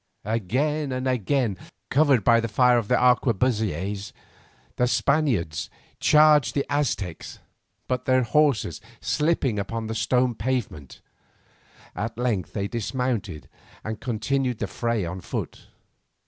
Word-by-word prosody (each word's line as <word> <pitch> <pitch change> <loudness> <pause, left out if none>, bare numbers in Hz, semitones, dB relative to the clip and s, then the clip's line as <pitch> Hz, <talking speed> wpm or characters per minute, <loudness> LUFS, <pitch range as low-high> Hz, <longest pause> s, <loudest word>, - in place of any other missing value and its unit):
Again 130 +8 -1
and 130 +1 -2
again, 125 -4 0 0.3
covered 140 -5 +4
by 115 +2 +5
the 115 - -1
fire 125 +3 +4
of 110 - -5
the - - +3
arquebusiers, 105 - +1 0.6
the 125 - +2
Spaniards 125 - 0 0.3
charged 150 -2 +5
the 140 - 0
Aztecs, 105 - -2 0.5
but 125 0 -2
their 130 -1 +3
horses 140 -4 +1 0.2
slipping 150 -8 0
upon 115 +3 -4
the 110 - -4
stone 125 +2 +1
pavement, 110 - -4 0.9
at 110 +5 -4
length 120 -7 -1
they 100 -2 -2
dismounted 115 - -3 0.4
and 110 0 -5
continued 125 +1 -1
the 105 - -2
fray 115 0 -2
on 90 +2 -5
foot. - - -6
120 Hz, 120 wpm, -25 LUFS, 105-130 Hz, 0.9 s, by